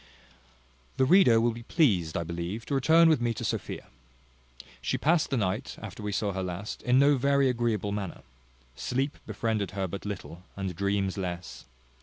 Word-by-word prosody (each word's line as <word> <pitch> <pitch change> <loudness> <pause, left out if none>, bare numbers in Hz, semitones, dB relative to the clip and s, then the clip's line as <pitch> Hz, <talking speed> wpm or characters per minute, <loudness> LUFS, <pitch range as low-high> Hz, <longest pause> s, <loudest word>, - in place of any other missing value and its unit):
The 130 - +4
reader 135 -8 +6
will 120 +1 +2
be 115 +1 -8
pleased, 105 - +2
I 85 - -1
believe, 85 +7 -5
to - - -4
return 160 +5 +5
with 155 -6 +3
me 120 -1 0
to - - -4
Sophia. - - -3 1.0
She - - -1
passed 160 +1 +2
the 135 - 0
night, 105 +4 -2
after 105 -1 -8
we 105 0 -3
saw 100 0 -1
her 95 - -3
last, 90 +3 -5
in 125 +1 +3
no 140 +1 +5
very 140 +1 +3
agreeable 115 -4 0
manner. 100 -4 -5 0.5
Sleep 130 - -2
befriended 110 -1 -1
her 95 -1 0
but 100 +3 -6
little, 95 -4 -6
and 95 -3 -4
dreams 100 +1 -1
less. 90 -1 -5
105 Hz, 175 wpm, -28 LUFS, 95-130 Hz, 1.0 s, reader